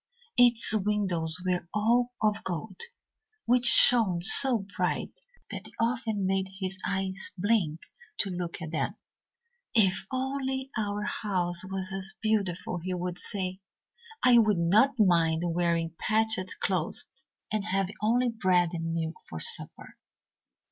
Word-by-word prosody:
Its 240 -3 +5
windows 190 -6 0
were 180 -1 -2
all 240 +4 +1
of 215 0 0
gold, 170 -5 -6 0.7
which 245 0 +4
shone 225 -6 +6
so 220 +4 +6
bright - - -3 0.3
that - - -8
it - - -17
often 230 -4 -1
made 190 0 -1
his 190 -1 -2
eyes 190 0 -3
blink 180 -5 0 0.4
to 195 - -1
look 175 -1 -5
at 160 - -7
them. 160 - -3 0.8
'If 195 -3 +2
only 265 0 -3
our 210 -2 -3
house 180 -5 -3
was 190 0 -2
as 190 0 -1
beautiful,' 200 -5 -2
he 185 +2 -4
would 180 0 -2
say. 185 -3 +5 0.7
'I 245 -2 +6
would 215 -4 +2
not 210 +11 +2
mind 170 -5 +2
wearing 170 -1 -1
patched 220 -3 -1
clothes 195 +9 -4 0.2
and 215 -1 -1
having 195 -1 -2
only 240 +3 +1
bread 185 -6 +1
and 165 -1 -4
milk 160 -1 -4
for 80 - -7
supper.' - - -3
195 Hz, 135 wpm, -27 LUFS, 175-220 Hz, 0.8 s, shone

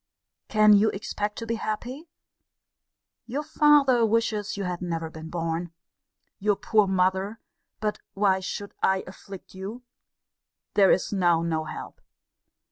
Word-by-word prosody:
Can 215 -1 +6
you 210 +2 +5
expect 205 +1 -4
to 230 - -4
be 230 0 -2
happy? 250 +9 -4 1.2
Your 275 +5 -3
father 295 -5 +4
wishes 220 -2 0
you 200 - -2
had 180 -1 -3
never 165 -2 -3
been 160 0 -9
born. 165 0 -3 0.7
Your 205 +1 +2
poor 210 0 +2
mother 190 +3 +1 0.4
but 210 -1 -2 0.2
why 195 -1 +3
should 200 +2 -5
I 190 0 +2
afflict 190 0 -11
you? 200 +6 -7 0.9
There 195 -2 +5
is 190 - +2
now 175 -4 +3
no 160 -2 -1
help! - - -8
200 Hz, 130 wpm, -26 LUFS, 180-220 Hz, 1.2 s, Can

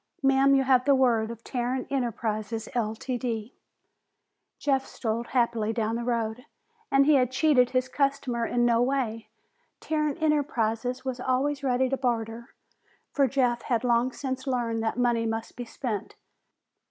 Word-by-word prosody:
"Ma'am, 270 0 +5
you 270 - +3
have 255 -1 +3
the 280 -1 +5
word 235 -4 +2
of 230 0 -8
Tarrant 250 0 -2
Enterprises, 225 -4 -2
Ltd." 235 0 -2 1.1
Jeff 270 -2 +1
strode 230 -2 -3
happily 235 -3 +1
down 225 0 -1
the 235 - -3
road, 235 +1 -2 0.4
and 275 0 +4
he 305 - +5
had 255 -3 +4
cheated 260 -2 +3
his 255 0 0
customer 275 -3 -1
in 240 +1 +1
no 235 -1 +3
way. 245 -4 -1 0.5
Tarrant 305 -1 -1
Enterprises 255 -5 0
was 260 -1 -3
always 270 +3 0
ready 260 -1 +2
to 270 +1 -1
barter, 235 -2 -2 0.6
for 275 -2 +3
Jeff 245 -2 +1
had 235 -1 -1
long 240 +1 +2
since 260 0 -5
learned 235 -3 -1
that 225 +1 -2
money 240 -2 +1
must 225 0 -4
be 245 - -6
spent. 230 -3 -5
245 Hz, 150 wpm, -27 LUFS, 230-265 Hz, 1.1 s, Ma'am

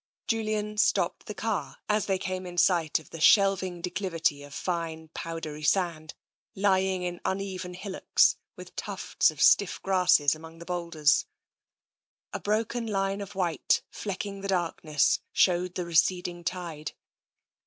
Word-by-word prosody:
Julian 215 -2 -1
stopped - - +1
the - - -5
car - - -3
as 210 -1 +1
they 195 -1 +1
came 185 0 -4
in 175 0 -9
sight 175 -3 +3
of 160 - -12
the 165 - -8
shelving 190 -2 +4
declivity 170 -5 -1
of 145 0 -11
fine, 165 -1 -4
powdery 165 -2 -5
sand, 160 -2 0 0.4
lying 190 -2 +2
in 175 -1 -4
un 190 - 0
even 185 -2 -5
hillocks, 190 +1 +2 0.2
with - - -12
tufts - - 0
of - - -8
stiff - - +4
grasses 180 -6 +4
amongst 160 +1 -11
the 170 - -10
boulders. 170 -3 +1 1.1
A - - -3
broken 225 +3 -1
line 195 -1 -1
of 200 0 -8
white, 175 -4 +1
flecking 200 0 -5
the 195 - -4
darkness, 165 -5 +1
showed 180 0 +2
the 180 - -2
receding 175 +1 +1
tide. 170 -4 -4
180 Hz, 145 wpm, -28 LUFS, 165-195 Hz, 1.1 s, shelving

